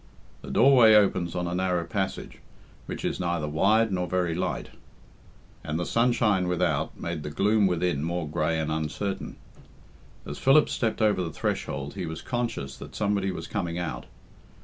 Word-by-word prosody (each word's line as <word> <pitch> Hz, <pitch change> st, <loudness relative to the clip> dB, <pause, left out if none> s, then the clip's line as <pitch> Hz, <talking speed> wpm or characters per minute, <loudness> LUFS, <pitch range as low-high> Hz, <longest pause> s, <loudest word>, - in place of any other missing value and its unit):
The -, -, -9 dB
doorway 120 Hz, -4 st, +6 dB
opens 95 Hz, -4 st, +2 dB
on 90 Hz, -, -1 dB
a 85 Hz, -, -3 dB
narrow 90 Hz, -1 st, 0 dB
passage, 95 Hz, +2 st, -4 dB, 0.5 s
which -, -, -5 dB
is -, -, -2 dB
neither 85 Hz, -4 st, -1 dB
wide 105 Hz, +8 st, +3 dB
nor 90 Hz, -1 st, -1 dB
very 90 Hz, -2 st, 0 dB
light, 90 Hz, +2 st, -3 dB, 0.9 s
and 75 Hz, +1 st, -3 dB
the 90 Hz, -, -2 dB
sunshine 115 Hz, -5 st, +2 dB
without 85 Hz, -4 st, -1 dB
made 85 Hz, -2 st, -4 dB
the 75 Hz, -, -5 dB
gloom 100 Hz, +6 st, +2 dB
within 90 Hz, -4 st, 0 dB
more 85 Hz, -1 st, -2 dB
grey 80 Hz, +1 st, 0 dB
and 80 Hz, -1 st, -2 dB
uncertain. 80 Hz, +6 st, -3 dB, 0.9 s
As 75 Hz, -, -7 dB
Philip 145 Hz, +3 st, +5 dB
stepped 110 Hz, -1 st, -1 dB
over 105 Hz, -3 st, +3 dB
the 85 Hz, -, -2 dB
threshold 70 Hz, -2 st, -3 dB
he 95 Hz, -3 st, -4 dB
was 80 Hz, 0 st, -6 dB
conscious 115 Hz, -, -3 dB
that -, -, -10 dB
somebody 100 Hz, -2 st, 0 dB
was 90 Hz, -, -5 dB
coming 85 Hz, 0 st, -3 dB
out. 85 Hz, -2 st, -4 dB
90 Hz, 165 wpm, -26 LUFS, 80-105 Hz, 0.9 s, doorway